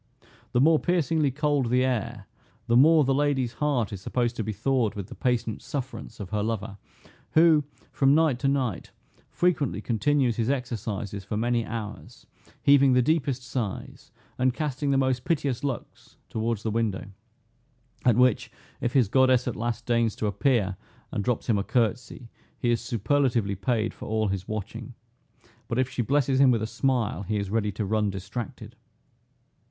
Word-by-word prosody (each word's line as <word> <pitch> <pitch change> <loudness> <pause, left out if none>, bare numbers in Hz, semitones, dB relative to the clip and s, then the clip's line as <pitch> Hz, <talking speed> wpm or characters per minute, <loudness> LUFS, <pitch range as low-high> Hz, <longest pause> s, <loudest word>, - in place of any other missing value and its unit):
The 120 - +3
more 155 +3 +5
piercingly 165 -4 +1
cold 145 -1 0
the 125 +1 +3
air, 125 -5 -2 0.4
the 120 -1 +2
more 155 +4 +6
the 135 0 +2
lady's 135 -3 +1
heart 140 -9 0
is 95 - -6
supposed 120 +3 -1
to 115 - -1
be 110 - -3
thawed 115 +1 0
with 100 0 -6
the - - -8
patient 120 -4 -1
sufferance 130 -5 -6
of 100 -2 -7
her 105 -1 0
lover, 105 -2 -3 0.5
who, 160 -2 +5 0.3
from 135 +1 +3
night 155 -6 +3
to 140 - 0
night, 130 -8 -1 0.4
frequently 160 - 0
continues 125 +2 +1
his 115 +1 0
exercises 110 -6 -3
for 105 +2 -4
many 120 +1 +1
hours, 115 +3 -7 0.4
heaving 140 -2 +6
the 125 0 +4
deepest 140 -3 0
sighs, 125 -5 -5 0.3
and 130 0 +2
casting 145 -2 -2
the 135 - +3
most 130 -2 +1
piteous 145 -7 -1
looks 135 -4 -6
towards 110 -1 -2
the 110 - -1
window; 110 -3 -1 1.0
at 120 -3 +4
which 125 -3 +3 0.3
if 120 -1 -1
his 130 -6 +4
goddess 130 +2 +3
at 125 - -2
last 120 +1 -3
deigns 115 -2 +1
to - - -3
appear, 105 -3 +1 0.3
and 105 -5 -2
drops 120 0 -1
him 110 -4 +2
a - - -1
curtsey, 120 +1 -1 0.3
he 120 - 0
is 115 - +1
superlatively 120 -2 0
paid 110 +2 -1
for - - -9
all 110 -1 0
his 95 0 -3
watching; 110 +3 -6 0.7
but 115 - -2
if 130 -1 +2
she 125 - -1
blesses 135 +1 +1
him 135 -1 +6
with 115 -3 +2
a - - 0
smile, 115 - 0
he 105 +2 -2
is 100 -1 -3
ready 105 -2 0
to 105 +2 -3
run 105 +1 +1
distracted. 110 +5 -6
120 Hz, 170 wpm, -26 LUFS, 110-135 Hz, 1.0 s, more